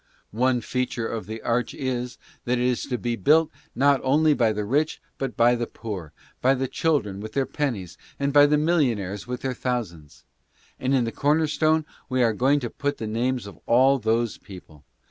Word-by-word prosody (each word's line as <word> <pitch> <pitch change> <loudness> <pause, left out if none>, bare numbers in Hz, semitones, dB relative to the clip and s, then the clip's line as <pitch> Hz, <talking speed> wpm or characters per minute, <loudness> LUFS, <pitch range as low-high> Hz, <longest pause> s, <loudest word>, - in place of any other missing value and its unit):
One 125 +2 +2
feature 125 -1 -2
of 115 -2 -5
the 110 +1 -7
arch 120 +1 -1
is 125 -2 -3 0.3
that 125 +1 +1
it 120 - 0
is 125 -1 0
to 125 -3 -2
be 120 0 -2
built 155 +6 +3 0.2
not 140 +1 +3
only 150 +3 +4
by 115 -5 +2
the 105 -1 -3
rich 145 +8 0 0.2
but 130 -5 -4
by 120 +1 +5
the 120 -1 -2
poor, 95 -9 -7 0.3
by 130 +2 +4
the 130 0 -2
children 125 -12 0
with 110 +1 -7
their 135 -1 +1
pennies 120 - -3 0.2
and 140 0 0
by 145 0 +7
the 150 +1 +3
millionaires 120 - 0
with 125 0 -4
their 130 -1 -2
thousands. 85 - -4 0.6
And 130 +1 +1
in 130 - +3
the 115 - -2
corner 150 +5 +2
stone 155 +1 +1 0.2
we 130 -1 +2
are 115 -2 +3
going 135 +6 +2
to 120 - -3
put 145 0 -2
the 110 - -5
names 120 +2 -1
of 100 -5 -11
all 130 +3 +4
those 115 0 0
people. 80 -6 -13
125 Hz, 200 wpm, -24 LUFS, 110-140 Hz, 0.6 s, by